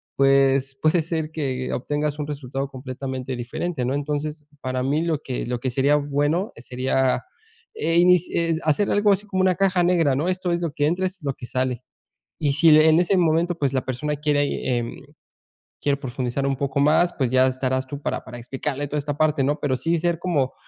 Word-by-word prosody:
pues 135 0 +3
puede 160 +2 +3
ser 160 -1 -3
que 130 -5 -3
obtengas 145 +3 -2
un 145 - -3
resultado 135 -1 -4
completamente 130 -1 -5
diferente, 125 +4 -3
¿no? 130 - -1
Entonces, 150 +1 -3 0.2
para 130 0 -2
mí 145 +4 +1
lo 165 -3 0
que 125 - -4
lo 125 -1 -2
que 130 - -2
sería 140 +3 +3
bueno 145 +6 0
sería, 130 +2 0 0.5
eh, 170 - 0
inic 180 -1 +6
eh, 165 -1 +1
hacer 155 +6 +1
algo 205 0 +4
así 200 +2 -2
como 190 -2 0
una 185 -2 +3
caja 190 -2 +2
negra, 170 -6 +3
¿no? 150 +6 -1
Esto 185 -1 -1
es 170 - -1
lo 165 -3 -2
que 145 - 0
entra, 180 +3 0
es 185 0 -7
lo 140 -1 -1
que 120 - -9
sale. 130 -1 -1 0.6
Y 140 -1 +2
si 155 +1 +6
en 155 +1 +6
ese 180 +2 +2
momento, 170 +1 +2
pues 140 -5 0
la 130 - -1
persona 150 +4 -2
quiere, 145 -1 +1 0.4
eh, - - -2 1.0
quiere 140 -1 +1
profundizar 130 0 -3
un 135 - +1
poco 140 +1 -2
más, 175 +4 +4
pues 130 -4 0
ya 130 0 +4
estarás 130 0 -1
tú 140 +1 -6
para - - -3
para 120 - -9
explicarle 135 +4 -4
toda 150 +2 -2
esta 145 0 -3
parte, 155 -2 +2
¿no? 145 +2 0
Pero 130 -3 0
sí 165 +5 0
ser 170 0 0
como 145 -8 0
145 Hz, 205 wpm, -23 LUFS, 130-165 Hz, 1.0 s, inic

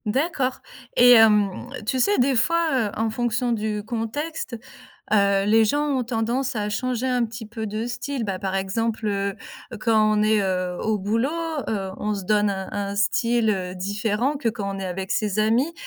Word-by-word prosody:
D'accord 265 +2 0 0.4
et 245 0 +8
hem, 210 -4 +5 0.2
tu 260 +4 0
sais 405 +11 +3
des 260 +1 +3
fois 335 +7 +2 0.2
heu, - - -9
en 225 0 0
fonction 240 +1 -1
du 215 -2 -2
contexte, 240 +4 -4 0.5
heu, 200 -2 +3
les 220 +1 +5
gens 290 +7 +1
ont 265 -3 0
tendance 240 +3 -1
à 210 -2 -2
changer 250 +3 -2
un 250 -2 +1
petit 220 0 -7
peu 220 0 -5
de 215 +2 -3
style. 245 +2 -4
Bah, 195 -3 -3
par 190 0 -3
exemple 215 +4 -1
heu, 200 -1 -1 0.5
quand 215 -2 +3
on - - +3
est 215 -1 +3
heu, 185 -2 -1
au 220 -1 0
boulot, 225 +7 0 0.4
heu 195 -3 -2
on 210 - -2
se 195 -2 -5
donne 210 +1 +2
un 190 -1 -4
un 200 0 -3
style 230 +3 +1
heu, 185 -3 -1
différent 205 +8 -1
que 240 -5 0
quand 200 -3 -4
on - - -7
est 195 - -4
avec 190 +1 -4
ses 210 -2 0
amis. 230 +9 +2
220 Hz, 190 wpm, -23 LUFS, 200-245 Hz, 0.5 s, et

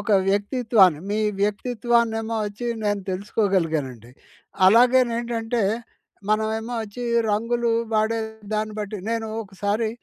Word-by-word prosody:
ఒక 205 +1 -4 0.2
వ్యక్తిత్వాన్ని 205 - +3
మీ 210 - 0 0.2
వ్యక్తిత్వాన్నేమొచ్చి 225 0 0 0.2
నేను 205 -1 0
తెలుసుకోగలిగానండి. 165 - -1 0.6
అలాగేనేంటంటే, 235 0 +3 0.7
మనమేమొచ్చి 220 +1 -2 0.3
రంగులు 230 +2 0 0.2
వాడే 220 +1 +2 0.4
దాన్ని 215 0 -1
బట్టి 210 0 -4
నేను 225 -1 -2
ఒకసారి 205 +3 -2
220 Hz, 85 wpm, -23 LUFS, 205-230 Hz, 0.7 s, వ్యక్తిత్వాన్ని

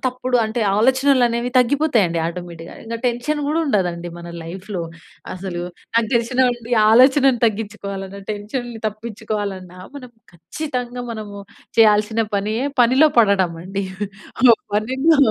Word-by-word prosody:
తప్పుడు 255 0 -1
అంటే 220 +2 -3 0.2
ఆలోచనలు 260 +3 +3
అనేవి 235 +1 -2
తగ్గిపోతాయండి 245 - +2
ఆటోమేటిక్‌గా. 170 -1 -7
ఇంక 230 +1 -4
టెన్షన్ 250 +5 -1
కూడా 305 +2 0
ఉండదండి 175 -8 -1
మన 170 0 -9
లైఫ్‌లో. 185 +2 -6 0.5
అసలు 180 -2 -5 0.3
నాకు 230 -1 +2
తెలిసి‌నండి 240 0 0 0.2
ఆలోచనను 260 +1 +5
తగ్గించుకోవాలన్న 200 -2 -5
టెన్షన్‌ని 225 +3 -5
తప్పించుకోవాలన్నా 210 -4 -5 0.2
మనం 255 -4 -9 0.2
ఖచ్చితంగా 245 - -5
మనము 210 -3 -7 0.4
చేయాల్సిన 215 +1 +4
పనియే 215 +6 -1 0.2
పనిలో 260 +6 +5
పడడం 195 -6 +3
అండి. 195 +2 -4 0.6
ఆ - - +9 0.3
పనిలో 260 +9 +2
225 Hz, 115 wpm, -20 LUFS, 195-250 Hz, 0.6 s, ఆ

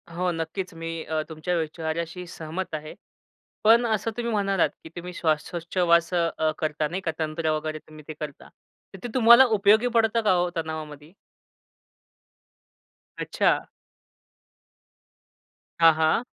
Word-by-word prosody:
हो, 175 +2 -1
नक्कीच, 170 +3 -4
मी 165 0 -5
अ, 155 0 -2
तुमच्या 160 +3 -3
विचाऱ्याशी 165 +2 -4
सहमत 170 +2 -6
आहे. 155 0 -7 0.7
पण 230 +3 +6
असं 225 0 0
तुम्ही 235 -1 -2
म्हणालात 195 -3 +1
की - - -10
तुम्ही 180 +1 -7
श्वासोच्छवास 170 +2 +1
अ, 165 -2 +1
करता 155 -1 -1
नाही 180 +5 -4
का 165 - -1
तंत्र 155 0 -1
वगैरे 155 0 -5
तुम्ही 155 0 -13
ते 155 - -5
करता. 150 -2 -8 0.4
तर 195 - -10
ते - - -3
तुम्हाला 235 +1 +8
उपयोगी 215 +4 +4
पडतं 225 0 +3
का 210 -3 +2
हो 180 0 +1
तणावामध्ये? 155 -2 -6 2.1
अच्छा. - - +1 2.1
हां, 165 -1 +7
हां. 160 +8 +2
170 Hz, 130 wpm, -25 LUFS, 155-190 Hz, 2.1 s, तुम्हाला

